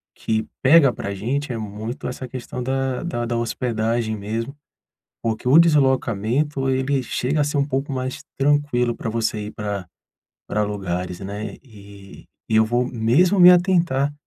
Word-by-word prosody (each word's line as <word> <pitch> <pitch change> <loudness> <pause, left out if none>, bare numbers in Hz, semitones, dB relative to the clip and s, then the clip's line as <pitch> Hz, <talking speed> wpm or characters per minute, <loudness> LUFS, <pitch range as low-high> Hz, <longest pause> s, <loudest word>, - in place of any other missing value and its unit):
que 110 0 -1 0.2
pega 140 0 +6
pra 100 - -5
gente 130 +7 -2
é - - -4
muito 110 +3 -6
essa 125 +1 -6
questão 125 0 -6
da 135 +1 -1
da 120 -9 -3
da 120 0 -1
hospedagem 115 -1 -1
mesmo, 115 +7 -4 0.7
porque 115 +2 -2
o 145 - +7
deslocamento 135 -3 +2
ele 130 +1 +1
chega 130 +4 -1
a - - +3
ser 145 -1 0
pouco 135 0 -2
mais 130 0 -4 0.2
tranquilo 140 -4 +2
pra - - -5
você 110 -2 -2
ir - - -6
pra 100 -4 -4 0.6
pra 105 - 0
lugares, 90 -3 -4
né. 100 +2 -5
E 100 -4 -14 0.2
e 110 - +2
eu 110 - +6
vou 120 +3 +1
mesmo 130 - +2
me 180 0 +10
atentar, 170 -6 +3
125 Hz, 155 wpm, -22 LUFS, 110-140 Hz, 0.7 s, me